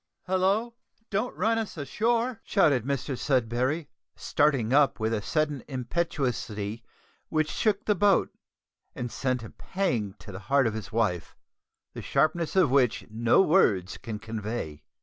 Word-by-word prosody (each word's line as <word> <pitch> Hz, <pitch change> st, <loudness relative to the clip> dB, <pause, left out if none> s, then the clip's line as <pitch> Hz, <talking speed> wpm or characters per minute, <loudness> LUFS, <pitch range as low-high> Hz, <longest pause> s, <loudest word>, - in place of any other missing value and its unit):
"Hallo! 195 Hz, +5 st, +1 dB, 0.4 s
don't 210 Hz, +5 st, -1 dB
run 225 Hz, +4 st, +2 dB
us 220 Hz, -6 st, -5 dB
ashore," 230 Hz, -, 0 dB
shouted 145 Hz, -, +3 dB
Mr 140 Hz, 0 st, -2 dB
Sudberry, 130 Hz, +4 st, 0 dB, 0.3 s
starting 135 Hz, -6 st, +1 dB
up 145 Hz, -3 st, +4 dB
with 110 Hz, +1 st, 0 dB
a 105 Hz, -, -1 dB
sudden 150 Hz, +2 st, -1 dB
impetuosity 125 Hz, -6 st, -2 dB, 0.5 s
which 155 Hz, -1 st, 0 dB
shook 215 Hz, -2 st, 0 dB
the 210 Hz, -, +3 dB
boat 200 Hz, +1 st, +3 dB, 0.6 s
and 120 Hz, -1 st, -4 dB
sent 130 Hz, -3 st, -1 dB
a 110 Hz, -, -9 dB
pang 120 Hz, -, -2 dB
to 105 Hz, -, -11 dB
the 95 Hz, -, -7 dB
heart 140 Hz, -1 st, +4 dB
of 115 Hz, -, 0 dB
his 105 Hz, -3 st, -6 dB
wife, 105 Hz, -7 st, -1 dB, 0.6 s
the -, -, -6 dB
sharpness 165 Hz, +2 st, +1 dB
of 180 Hz, -9 st, +4 dB
which 130 Hz, -4 st, +2 dB
no 115 Hz, -, +4 dB
words 100 Hz, -, +2 dB
can 110 Hz, -2 st, -5 dB
convey. 110 Hz, -8 st, -5 dB
135 Hz, 145 wpm, -27 LUFS, 115-185 Hz, 0.6 s, up